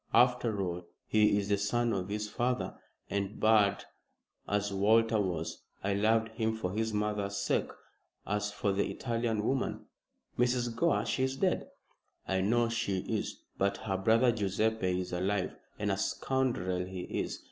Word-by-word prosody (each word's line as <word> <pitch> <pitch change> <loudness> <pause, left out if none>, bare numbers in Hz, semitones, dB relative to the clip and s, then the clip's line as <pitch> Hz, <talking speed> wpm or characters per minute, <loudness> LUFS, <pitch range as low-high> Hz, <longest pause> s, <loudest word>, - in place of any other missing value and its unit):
After 125 -4 +4
all, 90 -1 -4 0.2
he 105 -1 +4
is 100 -1 -1
the 100 -1 +2
son 120 +3 +1
of 95 0 -2
his 105 +1 -2
father, 125 +4 -1 0.3
and, 100 +1 -2
bad 110 -2 +4 0.6
as 105 0 0
Walter 110 +2 +4
was, 85 -4 -3 0.2
I 100 +1 +1
loved 110 +2 +2
him 110 0 -1
for 90 -5 -2
his 110 +1 0
mother's 105 -1 -1
sake. 100 - 0 0.6
As 105 0 -1
for 105 -1 0
the 100 +1 0
Italian 115 -3 -1
woman 130 +4 -1 0.3
" - - -25
"Mrs. 120 -1 +1
Gore! 170 +8 +2
She - - -1
is 130 0 +1
dead." 185 +2 +1 0.6
"I 95 -1 +1
know 115 +4 +3
she 100 -5 -1
is. - - -3 0.2
But 100 0 +2
her 95 -3 -2
brother 115 +6 +4
Guiseppe 100 -3 0
is 90 - -6
alive, 95 +2 0 0.2
and 105 -1 0
a 95 - 0
scoundrel 100 -6 0
he 90 0 -6
is. - - -3
105 Hz, 160 wpm, -31 LUFS, 100-115 Hz, 0.6 s, After